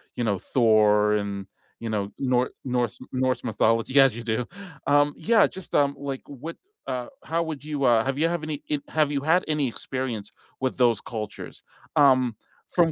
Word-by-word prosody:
you 120 Hz, -, -2 dB
know, 105 Hz, -4 st, +1 dB
Thor 105 Hz, -1 st, +3 dB
and, 100 Hz, -2 st, -2 dB, 0.3 s
you 115 Hz, -, -4 dB
know, 100 Hz, -2 st, -1 dB
Nor 125 Hz, -1 st, +1 dB
Norse 125 Hz, -3 st, -1 dB
Norse 130 Hz, 0 st, 0 dB
mythology 115 Hz, +3 st, +2 dB
as 135 Hz, -4 st, +6 dB
you 120 Hz, -, -6 dB
do 115 Hz, +1 st, -1 dB, 0.4 s
um, 145 Hz, 0 st, +4 dB
yeah, 225 Hz, -2 st, +4 dB
just, 190 Hz, -2 st, -7 dB
um, 140 Hz, -1 st, +3 dB
like, 140 Hz, -2 st, -4 dB
what 145 Hz, +4 st, -7 dB, 0.3 s
uh, 125 Hz, -1 st, -3 dB, 0.2 s
how 165 Hz, +1 st, 0 dB
would 155 Hz, -3 st, -5 dB
you, 150 Hz, -2 st, -3 dB
uh 120 Hz, -3 st, +5 dB
have 135 Hz, 0 st, -1 dB
you 160 Hz, +3 st, +3 dB
have 170 Hz, -2 st, -2 dB
any 155 Hz, -2 st, -4 dB, 0.2 s
have 155 Hz, -2 st, +1 dB
you 140 Hz, -, 0 dB
had 165 Hz, +5 st, +3 dB
any 150 Hz, -3 st, +1 dB
experience 120 Hz, -3 st, -3 dB, 0.3 s
with 130 Hz, -, -1 dB
those 120 Hz, -4 st, +3 dB
cultures? 110 Hz, -3 st, -7 dB, 0.3 s
Um, 130 Hz, -5 st, +5 dB, 0.4 s
from 170 Hz, -2 st, +4 dB
130 Hz, 175 wpm, -25 LUFS, 115-145 Hz, 0.4 s, as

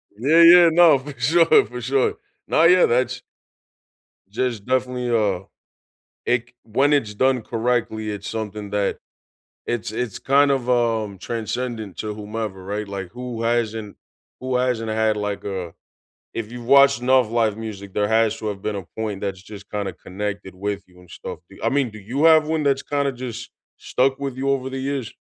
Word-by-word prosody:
Yeah, 145 Hz, +10 st, +4 dB
yeah, 170 Hz, 0 st, +9 dB
no, 160 Hz, -4 st, +6 dB
for 135 Hz, -1 st, -10 dB
sure, 165 Hz, -, +5 dB
for -, -, -8 dB
sure. 430 Hz, 0 st, +1 dB, 0.3 s
No, 160 Hz, -, +3 dB
yeah, 180 Hz, +2 st, +6 dB
that's 125 Hz, +1 st, 0 dB, 1.1 s
just 115 Hz, -1 st, -2 dB
definitely, 125 Hz, -1 st, -1 dB
uh, 105 Hz, -6 st, +1 dB, 0.8 s
it 120 Hz, 0 st, 0 dB
c -, -, -29 dB
When 135 Hz, +6 st, +2 dB
it's 115 Hz, -8 st, +1 dB
done 130 Hz, +2 st, +2 dB
correctly, 115 Hz, -2 st, -1 dB
it's 100 Hz, -1 st, -6 dB
something 105 Hz, -2 st, -5 dB
that 100 Hz, -1 st, 0 dB, 0.7 s
it's 120 Hz, -2 st, -3 dB
it's 115 Hz, -2 st, -3 dB
kind 140 Hz, +2 st, +3 dB
of, 130 Hz, -3 st, 0 dB
um, 115 Hz, -5 st, 0 dB
transcendent 115 Hz, -1 st, -4 dB
to 105 Hz, -1 st, -4 dB
whomever, 105 Hz, -2 st, -5 dB
right? 105 Hz, +2 st, -4 dB
Like, 95 Hz, -2 st, -6 dB
who 120 Hz, -1 st, -6 dB
hasn't 115 Hz, -3 st, -1 dB, 0.4 s
who 130 Hz, 0 st, -1 dB
hasn't 125 Hz, -3 st, 0 dB
had 110 Hz, 0 st, +1 dB
like, 105 Hz, -1 st, -3 dB
uh 95 Hz, -4 st, -4 dB, 0.6 s
If 115 Hz, -1 st, -5 dB
you've 120 Hz, -1 st, -8 dB
watched 140 Hz, 0 st, +6 dB
enough 130 Hz, -2 st, +3 dB
live 110 Hz, -3 st, +1 dB
music, 100 Hz, -3 st, -7 dB
there 105 Hz, 0 st, +1 dB
has 110 Hz, 0 st, +2 dB
to 110 Hz, -, -4 dB
have 100 Hz, -2 st, -4 dB
been 105 Hz, 0 st, -3 dB
a 95 Hz, -, -7 dB
point 105 Hz, -3 st, -3 dB
that's 95 Hz, -2 st, -4 dB
just 100 Hz, 0 st, -12 dB
kinda 100 Hz, -2 st, -3 dB
connected 100 Hz, 0 st, -6 dB
with 100 Hz, +1 st, -3 dB
you 90 Hz, -1 st, -20 dB
and 90 Hz, -1 st, -18 dB
stuff, -, -, -8 dB
do 100 Hz, -, -15 dB
you -, -, -12 dB
I 115 Hz, -, +2 dB
mean, 135 Hz, -2 st, +1 dB
do 110 Hz, -, -10 dB
you 120 Hz, +9 st, -3 dB
have 160 Hz, -1 st, +6 dB
one 160 Hz, -1 st, 0 dB
that's 140 Hz, -1 st, +2 dB
kinda 140 Hz, -1 st, 0 dB
just 125 Hz, -1 st, -7 dB, 0.3 s
stuck 135 Hz, +1 st, 0 dB
with 135 Hz, -2 st, -4 dB
you 135 Hz, +1 st, -1 dB
over 135 Hz, -1 st, 0 dB
the 135 Hz, 0 st, -5 dB
years? 135 Hz, -4 st, -3 dB
115 Hz, 185 wpm, -22 LUFS, 105-130 Hz, 1.1 s, yeah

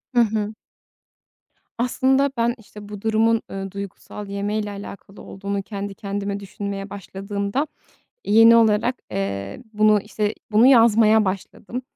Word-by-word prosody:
Hı 240 Hz, -, +6 dB
hı. 215 Hz, -1 st, 0 dB, 1.2 s
Aslında, 265 Hz, +3 st, +2 dB
ben 235 Hz, +1 st, +1 dB
işte 210 Hz, -2 st, -13 dB
bu 205 Hz, -1 st, -8 dB
durumun, 225 Hz, +1 st, +2 dB
ııı, 195 Hz, 0 st, -5 dB
duygusal 200 Hz, +1 st, -8 dB
yemeyle 205 Hz, +1 st, -2 dB
alakalı 200 Hz, 0 st, -10 dB
olduğunu 200 Hz, +1 st, -4 dB
kendi 200 Hz, -1 st, -5 dB
kendime 200 Hz, 0 st, -4 dB
düşünmeye 200 Hz, 0 st, -6 dB
başladığımda 200 Hz, -, -3 dB, 0.6 s
yeni 225 Hz, +2 st, +7 dB
olarak, 225 Hz, +2 st, +3 dB
eee, 100 Hz, 0 st, -4 dB
bunu 215 Hz, 0 st, +4 dB
işte, 210 Hz, +1 st, -2 dB, 0.2 s
bunu 220 Hz, +4 st, +5 dB
yazmaya 225 Hz, -3 st, +6 dB
başladım. 200 Hz, +5 st, -4 dB
210 Hz, 120 wpm, -22 LUFS, 200-225 Hz, 1.2 s, yeni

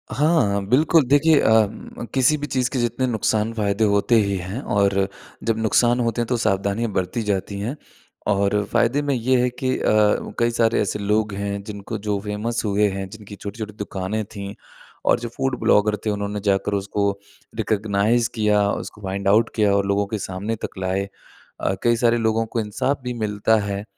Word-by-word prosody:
हाँ, 135 Hz, -11 st, +2 dB
बिल्कुल 155 Hz, +5 st, +4 dB
देखिए 145 Hz, +3 st, +5 dB
अ, 110 Hz, -1 st, +4 dB, 0.5 s
किसी 135 Hz, +3 st, +4 dB
भी 145 Hz, 0 st, -4 dB
चीज़ 125 Hz, -3 st, 0 dB
के 130 Hz, -, -1 dB
जितने 120 Hz, +2 st, 0 dB
नुकसान-फ़ायदे 110 Hz, -2 st, 0 dB
होते 100 Hz, +3 st, +3 dB
ही 100 Hz, -3 st, +2 dB
हैं 95 Hz, +9 st, -5 dB
और 100 Hz, -1 st, +1 dB, 0.4 s
जब 115 Hz, 0 st, 0 dB
नुकसान 120 Hz, +2 st, +2 dB
होते 115 Hz, 0 st, 0 dB
हैं 115 Hz, -, -2 dB
तो 125 Hz, 0 st, 0 dB
सावधानियाँ 105 Hz, +1 st, 0 dB
बरती 95 Hz, +5 st, -2 dB
जाती 100 Hz, 0 st, -2 dB
हैं। 115 Hz, +8 st, -3 dB, 0.5 s
और 100 Hz, 0 st, +2 dB
फ़ायदे 120 Hz, +4 st, +2 dB
में 145 Hz, -1 st, 0 dB
ये 125 Hz, +1 st, +2 dB
है 125 Hz, -, +2 dB
कि 130 Hz, +1 st, -2 dB
अ, -, -, -5 dB, 0.6 s
कई 120 Hz, 0 st, +2 dB
सारे 115 Hz, 0 st, +2 dB
ऐसे 105 Hz, +1 st, -2 dB
लोग 105 Hz, +1 st, 0 dB
हैं, 100 Hz, 0 st, -3 dB
जिनको 105 Hz, +1 st, -6 dB
जो 105 Hz, -1 st, -2 dB
फ़ेमस 105 Hz, +3 st, -2 dB
हुए 105 Hz, 0 st, +2 dB
हैं, 95 Hz, 0 st, -4 dB
जिनकी 105 Hz, -1 st, -11 dB
छोटी-छोटी 105 Hz, +1 st, -7 dB
दुकानें 105 Hz, +1 st, -3 dB
थी, 100 Hz, -1 st, -8 dB, 0.5 s
और -, -, +3 dB
जो 120 Hz, 0 st, -5 dB
फूड 135 Hz, -2 st, -1 dB
ब्लॉगर 105 Hz, 0 st, +3 dB
थे, 110 Hz, -, +1 dB
उन्होंने 105 Hz, 0 st, -2 dB
जाकर 100 Hz, +1 st, +1 dB
उसको 100 Hz, 0 st, 0 dB, 0.5 s
रिकग्नाइज़ 110 Hz, +3 st, +1 dB
किया, 105 Hz, -2 st, +2 dB
उसको 105 Hz, -, -6 dB
फाइंड 100 Hz, 0 st, -3 dB
आउट 110 Hz, +4 st, +4 dB
किया 105 Hz, -3 st, +3 dB
और 100 Hz, 0 st, +1 dB
लोगों 100 Hz, +1 st, +1 dB
के 110 Hz, -, -3 dB
सामने 100 Hz, +5 st, -3 dB
तक -, -, -10 dB
लाए। 95 Hz, +1 st, -1 dB, 0.5 s
अ, 95 Hz, -, +1 dB
कई 120 Hz, 0 st, +4 dB
सारे 120 Hz, 0 st, +3 dB
लोगों 115 Hz, 0 st, +1 dB
को 115 Hz, +1 st, -3 dB
इंसाफ 115 Hz, +6 st, -1 dB
भी 125 Hz, -1 st, -3 dB
मिलता 105 Hz, +1 st, +2 dB
है। 100 Hz, +1 st, -3 dB
105 Hz, 185 wpm, -22 LUFS, 100-120 Hz, 0.6 s, देखिए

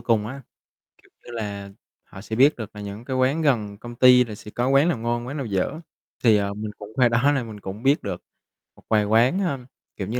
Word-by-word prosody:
cùng 110 Hz, -3 st, +1 dB
á, 135 Hz, +4 st, -7 dB, 0.6 s
kiểu -, -, -25 dB, 0.2 s
như -, -, -10 dB
là, 100 Hz, -3 st, -5 dB, 0.3 s
họ 95 Hz, -, -12 dB
sẽ 110 Hz, +1 st, -5 dB
biết 140 Hz, +6 st, +5 dB
được 110 Hz, -2 st, -8 dB
là 105 Hz, -, -7 dB
những 100 Hz, +3 st, -7 dB
cái 130 Hz, -, -3 dB
quán 130 Hz, +5 st, +2 dB
gần 110 Hz, -9 st, 0 dB
công 120 Hz, +3 st, -9 dB
ty 125 Hz, 0 st, +7 dB
là 110 Hz, -3 st, -8 dB
sẽ 105 Hz, -, -11 dB
có 120 Hz, +3 st, -1 dB
quán 140 Hz, +5 st, +4 dB
nào 155 Hz, -, 0 dB
ngon, 120 Hz, +1 st, -2 dB
quán 140 Hz, +4 st, -5 dB
nào 135 Hz, -, -3 dB
dở. 100 Hz, +8 st, -2 dB, 0.4 s
Thì, 110 Hz, -3 st, +6 dB
ờ, 100 Hz, 0 st, -1 dB
mình 105 Hz, +1 st, -5 dB
cũng 105 Hz, -, -10 dB
qua 125 Hz, -2 st, +4 dB
đó 120 Hz, +5 st, +3 dB
nên 125 Hz, -4 st, -2 dB
mình 105 Hz, -2 st, -9 dB
cũng 100 Hz, +3 st, -8 dB
biết 140 Hz, +2 st, +3 dB
được -, -, -4 dB, 0.5 s
một -, -, -21 dB
vài 105 Hz, -2 st, +3 dB
quán, 115 Hz, -, +3 dB
ơ, 145 Hz, -8 st, -1 dB, 0.4 s
kiểu 95 Hz, -, -5 dB
như 120 Hz, +3 st, -2 dB
115 Hz, 245 wpm, -24 LUFS, 105-130 Hz, 0.6 s, ty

